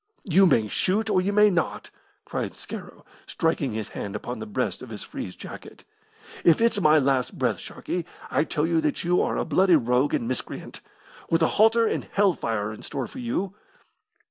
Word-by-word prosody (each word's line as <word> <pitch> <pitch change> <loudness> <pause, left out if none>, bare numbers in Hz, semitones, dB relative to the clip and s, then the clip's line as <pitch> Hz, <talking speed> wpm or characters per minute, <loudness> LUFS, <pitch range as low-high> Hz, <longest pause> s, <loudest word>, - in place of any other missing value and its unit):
"You 190 +2 +6
may 110 -10 +3
shoot, 205 - 0
or 185 - +3
you 195 +2 0
may 210 0 +5
not!" 175 -2 -2 0.3
cried - - -4
Scarrow, - - -9 0.2
striking 160 -7 0
his 110 -1 -4
hand 100 0 -6
upon 120 +2 -5
the 110 - -6
breast 125 +5 -2
of 130 - -9
his 105 -3 -7
frieze 90 - -7
jacket. - - -10 0.6
"If 170 - +5
it's 230 -3 +2
my 155 -2 +6
last 135 -3 +1
breath, - - 0
Sharkey, 175 -2 -5 0.2
I - - +3
tell 155 -1 -1
you 165 -1 +2
that 150 -2 -1
you 175 +1 +2
are - - 0
a - - -1
bloody 185 -2 +4
rogue 125 0 +2
and 115 - -2
miscreant, 130 0 -5 0.5
with 165 0 +3
a - - +5
halter 225 +1 +5
and - - -1
hell 200 -2 +4
fire 105 -6 -2
in 105 - -11
store 135 -3 -4
for 260 - -10
you!" 200 -6 -2
160 Hz, 195 wpm, -25 LUFS, 125-190 Hz, 0.6 s, You